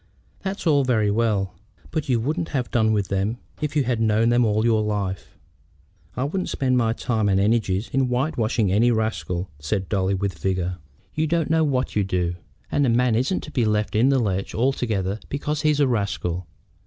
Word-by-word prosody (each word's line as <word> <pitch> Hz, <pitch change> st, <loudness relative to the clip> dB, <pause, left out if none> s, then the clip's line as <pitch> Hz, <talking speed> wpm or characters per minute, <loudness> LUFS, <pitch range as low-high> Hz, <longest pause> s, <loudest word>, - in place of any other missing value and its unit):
"That's 195 Hz, 0 st, -5 dB
all 145 Hz, -4 st, +4 dB
very 110 Hz, -5 st, +2 dB
well; 105 Hz, -4 st, 0 dB, 0.4 s
but 155 Hz, -3 st, -3 dB
you 120 Hz, -2 st, +3 dB
wouldn't 160 Hz, +8 st, -2 dB
have 125 Hz, -, -3 dB
done 110 Hz, -2 st, +3 dB
with 105 Hz, -3 st, 0 dB
them 100 Hz, +4 st, -1 dB, 0.2 s
if 150 Hz, 0 st, -2 dB
you 145 Hz, -, +3 dB
had 120 Hz, -2 st, -1 dB
known 110 Hz, +1 st, +3 dB
them 120 Hz, +1 st, +4 dB
all 110 Hz, 0 st, +2 dB
your 110 Hz, -2 st, +3 dB
life." 100 Hz, -3 st, -3 dB, 0.8 s
"I 125 Hz, -, 0 dB
wouldn't 180 Hz, +7 st, -2 dB
spend 130 Hz, -2 st, 0 dB
my 115 Hz, -3 st, +2 dB
time 110 Hz, -3 st, 0 dB
and 95 Hz, -1 st, +3 dB
energies 105 Hz, -1 st, +1 dB
in 135 Hz, -1 st, +1 dB
white 130 Hz, +6 st, 0 dB
washing 110 Hz, -3 st, +1 dB
any 110 Hz, +5 st, +4 dB
rascal," 110 Hz, -6 st, -1 dB
said 95 Hz, +6 st, -2 dB
Dolly, 95 Hz, -2 st, +1 dB
with 100 Hz, 0 st, -3 dB
vigor. 90 Hz, -1 st, -1 dB, 0.3 s
"You 155 Hz, +1 st, 0 dB
don't 165 Hz, -1 st, 0 dB
know 160 Hz, 0 st, +4 dB
what 135 Hz, -4 st, 0 dB
you'd 100 Hz, -2 st, +1 dB
do. 90 Hz, -2 st, 0 dB, 0.4 s
And 145 Hz, -, +2 dB
a -, -, +2 dB
man 120 Hz, 0 st, +3 dB
isn't 130 Hz, +11 st, +1 dB
to 150 Hz, -, -9 dB
be 125 Hz, -, +1 dB
left 105 Hz, -1 st, 0 dB
in 120 Hz, +5 st, +4 dB
the 135 Hz, -, +3 dB
lurch 95 Hz, -5 st, -1 dB
altogether 110 Hz, -6 st, 0 dB
because 145 Hz, +1 st, -2 dB
he's 150 Hz, -1 st, +2 dB
a 145 Hz, -, +4 dB
rascal. 90 Hz, -6 st, -2 dB
115 Hz, 200 wpm, -23 LUFS, 100-130 Hz, 0.8 s, all